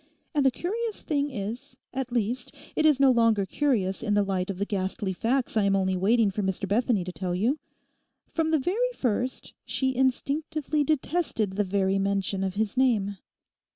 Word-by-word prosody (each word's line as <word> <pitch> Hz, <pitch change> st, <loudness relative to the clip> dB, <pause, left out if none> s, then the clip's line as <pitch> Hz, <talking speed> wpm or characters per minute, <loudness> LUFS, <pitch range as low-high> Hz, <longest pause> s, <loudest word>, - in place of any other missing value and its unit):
And 290 Hz, -3 st, +2 dB
the 270 Hz, -, +6 dB
curious 430 Hz, -, -3 dB
thing 290 Hz, -1 st, 0 dB
is—at 245 Hz, +3 st, -6 dB
least, 240 Hz, +1 st, -2 dB, 0.2 s
it 310 Hz, -, +4 dB
is 295 Hz, -3 st, +4 dB
no 275 Hz, -1 st, +6 dB
longer 230 Hz, -4 st, +3 dB
curious 200 Hz, -6 st, 0 dB
in 210 Hz, -2 st, 0 dB
the 205 Hz, -, +4 dB
light 190 Hz, -1 st, -1 dB
of 195 Hz, -, -3 dB
the 200 Hz, -, -1 dB
ghastly 195 Hz, 0 st, -2 dB
facts 240 Hz, +7 st, 0 dB
I 215 Hz, -, +4 dB
am 195 Hz, 0 st, +3 dB
only 190 Hz, -1 st, +1 dB
waiting 210 Hz, +3 st, +3 dB
for 210 Hz, -, -2 dB
Mr 190 Hz, 0 st, -2 dB
Bethany 215 Hz, -1 st, +2 dB
to 180 Hz, -, -5 dB
tell 180 Hz, -1 st, -3 dB
you—from 290 Hz, -, -4 dB
the 320 Hz, -, +3 dB
very 420 Hz, -, 0 dB
first 250 Hz, -, -2 dB
she 265 Hz, -1 st, -1 dB
instinctively 290 Hz, +3 st, 0 dB
detested 295 Hz, -, 0 dB
the 205 Hz, +2 st, 0 dB
very 195 Hz, 0 st, +1 dB
mention 195 Hz, 0 st, 0 dB
of 190 Hz, 0 st, -2 dB
his 215 Hz, +1 st, -1 dB
name. 215 Hz, -7 st, +2 dB
230 Hz, 175 wpm, -27 LUFS, 195-275 Hz, 0.2 s, the